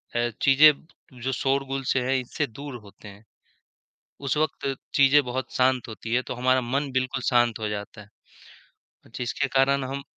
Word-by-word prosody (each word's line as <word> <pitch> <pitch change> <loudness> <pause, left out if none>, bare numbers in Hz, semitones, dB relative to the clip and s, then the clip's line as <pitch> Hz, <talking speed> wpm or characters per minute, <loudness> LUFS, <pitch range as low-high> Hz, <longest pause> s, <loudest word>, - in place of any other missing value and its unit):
अ, 120 0 +1
चीज़ें 140 -1 +3
जो 135 - -1
शोरगुल 135 +1 -1
से 135 - +2
है 130 +1 +1
इससे 135 +4 -3
दूर 140 +3 -9
होते 100 +1 -15
हैं। 100 +1 -13 1.0
उस 135 - 0
वक़्त 145 -3 -1 0.2
चीजें 140 +1 +6
बहुत 130 +1 -5
शांत 130 -1 +2
होती 110 +1 -6
है 125 - +3
तो - - -3
हमारा 130 +1 +2
मन 135 +3 -2
बिल्कुल 130 0 -1
शांत 120 -3 +2
हो 110 - -2
जाता 105 +1 -6
है। 105 - -15 1.0
अ, - - -18
जिसके 125 +3 -2
कारण 135 +1 +3
हम 135 +2 -5
130 Hz, 170 wpm, -25 LUFS, 120-135 Hz, 1.0 s, चीजें